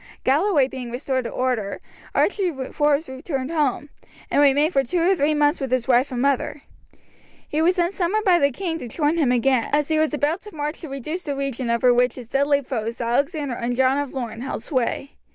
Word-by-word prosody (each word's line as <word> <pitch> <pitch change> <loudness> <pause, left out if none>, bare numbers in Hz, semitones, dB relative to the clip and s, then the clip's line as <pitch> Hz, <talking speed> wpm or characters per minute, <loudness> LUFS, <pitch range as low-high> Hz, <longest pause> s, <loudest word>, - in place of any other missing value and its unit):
Galloway 290 0 +3
being 255 -2 -7
restored 260 +1 -2
to - - -2
order, 245 -6 -2 0.4
Archie 390 -3 +2 0.2
Forbes 295 +1 +1
returned 265 +1 -4
home, 295 -2 0 0.4
and - - +4
remained 290 +4 +4
for 275 - +3
two 305 +8 -1
or 360 +3 +3
three 300 -1 +1
months 295 +1 +2
with 270 - -2
his 255 -1 0
wife 255 +2 +3
and 250 - -3
mother. 275 0 0 0.8
He 305 - -1
was 355 +3 +3
then 345 0 +1
summoned 395 +3 -1
by 360 -3 +5
the 280 - +4
king 330 +4 -4
to 245 - -6
join 300 +6 0
him 275 -6 +3
again, 250 -1 +2
as 295 0 +1
he 315 -1 +2
was 315 0 +2
about 300 +4 0
to 420 -5 -12
march 300 +1 -4
to 320 - -7
reduce 290 +6 -4
the 290 -5 -4
region 275 -3 -3
over 235 +1 +4
which 245 +1 +2
his 245 -3 -10
deadly 280 +1 +2
foes 230 -3 -4
Alexander 280 +4 0
and 240 +1 -2
John 265 +2 +3
of 285 -2 -3
Lorne 235 -4 -5
held 255 -3 -4
sway. 265 +1 -2
280 Hz, 210 wpm, -23 LUFS, 255-310 Hz, 0.8 s, by